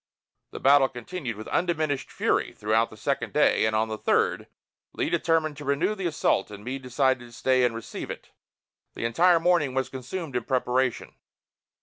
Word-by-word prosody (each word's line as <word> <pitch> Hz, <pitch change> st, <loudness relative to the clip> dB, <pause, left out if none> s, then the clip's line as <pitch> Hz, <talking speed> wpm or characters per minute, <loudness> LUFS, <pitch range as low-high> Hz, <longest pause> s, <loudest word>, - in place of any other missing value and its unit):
The -, -, -8 dB
battle 135 Hz, -1 st, +5 dB
continued 125 Hz, 0 st, -6 dB
with 110 Hz, +1 st, -9 dB
undiminished 155 Hz, -5 st, -1 dB
fury -, -, 0 dB
throughout 110 Hz, +2 st, +1 dB
the 110 Hz, -, -13 dB
second 135 Hz, +6 st, -2 dB
day; 150 Hz, -, +3 dB
and 110 Hz, -, -1 dB
on 110 Hz, +1 st, +2 dB
the 110 Hz, -1 st, -5 dB
third, -, -, +1 dB, 0.5 s
Lee -, -, -2 dB
determined 160 Hz, -3 st, +1 dB
to 145 Hz, -, -8 dB
renew 145 Hz, +9 st, +1 dB
the 195 Hz, -4 st, -3 dB
assault 150 Hz, -, +1 dB
and 105 Hz, 0 st, -10 dB
Meade 130 Hz, +3 st, -4 dB
decided 130 Hz, 0 st, +1 dB
to 120 Hz, -, -13 dB
stay 130 Hz, +2 st, +2 dB
and 120 Hz, -2 st, +1 dB
receive 115 Hz, -, -7 dB
it. -, -, -8 dB, 0.6 s
The -, -, -3 dB
entire 170 Hz, +9 st, +4 dB
morning 165 Hz, -6 st, +2 dB
was 130 Hz, -1 st, 0 dB
consumed 135 Hz, +3 st, -6 dB
in 125 Hz, -, -1 dB
preparation. 130 Hz, -1 st, 0 dB
130 Hz, 180 wpm, -26 LUFS, 115-155 Hz, 0.6 s, battle